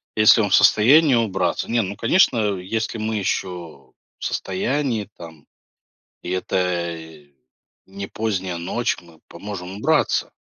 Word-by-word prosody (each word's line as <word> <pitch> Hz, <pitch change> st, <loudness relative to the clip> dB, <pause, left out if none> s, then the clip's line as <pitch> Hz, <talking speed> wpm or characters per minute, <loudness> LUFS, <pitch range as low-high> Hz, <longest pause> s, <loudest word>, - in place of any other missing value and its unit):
если 110 Hz, +1 st, +6 dB
он 100 Hz, -, 0 dB
в -, -, +5 dB
состоянии, 140 Hz, +7 st, +5 dB
убраться. 95 Hz, -5 st, -1 dB
Не, 115 Hz, 0 st, +2 dB
ну, 100 Hz, +2 st, -5 dB
конечно, 115 Hz, -, +2 dB
если 110 Hz, +5 st, -3 dB
мы 110 Hz, 0 st, -2 dB
еще 85 Hz, -9 st, -4 dB, 0.2 s
в -, -, -7 dB
состоянии 115 Hz, +3 st, -2 dB
там 80 Hz, -3 st, -12 dB, 0.8 s
и 90 Hz, -, -6 dB
это 85 Hz, -4 st, -3 dB, 0.6 s
не 100 Hz, +1 st, -7 dB
поздняя 95 Hz, -5 st, -3 dB
ночь- 105 Hz, +8 st, -1 dB
мы 85 Hz, -2 st, -19 dB
поможем 95 Hz, -2 st, -8 dB
убраться 155 Hz, +7 st, +1 dB
100 Hz, 125 wpm, -21 LUFS, 90-110 Hz, 0.8 s, если